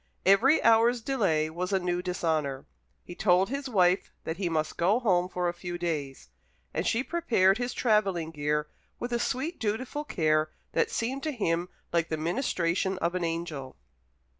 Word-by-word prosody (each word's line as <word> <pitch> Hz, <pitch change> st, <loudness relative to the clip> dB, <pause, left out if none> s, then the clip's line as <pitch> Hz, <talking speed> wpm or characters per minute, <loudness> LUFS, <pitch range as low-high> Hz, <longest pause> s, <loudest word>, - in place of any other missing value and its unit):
Every 240 Hz, +11 st, +5 dB
hour's 230 Hz, +2 st, +5 dB
delay 195 Hz, -, +1 dB
was 180 Hz, +3 st, -3 dB
a 195 Hz, -, +3 dB
new 180 Hz, -1 st, -1 dB
dishonour. 160 Hz, -7 st, -1 dB, 0.4 s
He 175 Hz, -, -9 dB
told 185 Hz, +1 st, +3 dB
his 275 Hz, 0 st, -3 dB
wife 185 Hz, -4 st, +2 dB
that 160 Hz, -, -4 dB
he 185 Hz, -3 st, -1 dB
must 155 Hz, -1 st, -1 dB
go 195 Hz, +7 st, +2 dB
home 180 Hz, -7 st, +2 dB
for 180 Hz, -1 st, -1 dB
a 175 Hz, -, -1 dB
few 175 Hz, 0 st, -6 dB
days; 145 Hz, -, -4 dB, 0.4 s
and -, -, -1 dB
she 235 Hz, +3 st, +1 dB
prepared 240 Hz, -, +2 dB
his 245 Hz, 0 st, -1 dB
travelling 195 Hz, -8 st, +1 dB
gear, 150 Hz, 0 st, -1 dB, 0.3 s
with 240 Hz, 0 st, -4 dB
a 235 Hz, -, +1 dB
sweet 265 Hz, +7 st, -2 dB
dutiful 245 Hz, +7 st, -2 dB
care 155 Hz, -, +1 dB, 0.2 s
that -, -, +1 dB
seemed 260 Hz, +4 st, -2 dB
to 310 Hz, -, -2 dB
him 175 Hz, -, -1 dB, 0.2 s
like 170 Hz, -1 st, +1 dB
the 160 Hz, -, -1 dB
ministration 175 Hz, -, 0 dB
of 170 Hz, -1 st, -1 dB
an 185 Hz, -1 st, -2 dB
angel. 165 Hz, -5 st, -4 dB
180 Hz, 170 wpm, -28 LUFS, 165-230 Hz, 0.4 s, Every